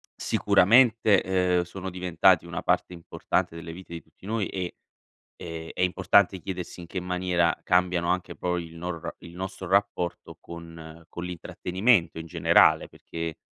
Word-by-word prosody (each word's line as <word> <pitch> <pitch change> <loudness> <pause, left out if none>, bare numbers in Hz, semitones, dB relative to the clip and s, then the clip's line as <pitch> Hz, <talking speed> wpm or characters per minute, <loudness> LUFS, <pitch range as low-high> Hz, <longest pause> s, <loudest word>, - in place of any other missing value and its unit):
sicuramente, 100 -5 +3
uhm, - - +1
sono 95 +2 -7
diventati 90 -1 +3
una 85 -1 -5
parte 90 - 0
importante 85 -1 -2
delle 85 0 -8
vite 90 -1 -11
di 85 - -7
tutti 95 - -21
noi 110 -2 -1
e 90 -2 -5 0.6
e 80 -1 -7
è - - -6
importante 90 +1 +3
chiedersi 90 0 -6
in 85 - -8
che 95 +2 -4
maniera 90 -2 0
cambiano, 90 -1 +2
anche 90 0 -2
poi 90 -1 -2
il 80 0 -13
nor 85 -1 -5
il 85 0 -13
nostro 95 0 -6
rapporto 90 -2 -1
con 85 -1 -11
con 85 - -7
l'intrattenimento 90 +2 0
in 80 - -8
generale, 80 0 +4
perché 80 -1 -7
90 Hz, 150 wpm, -26 LUFS, 85-95 Hz, 0.6 s, generale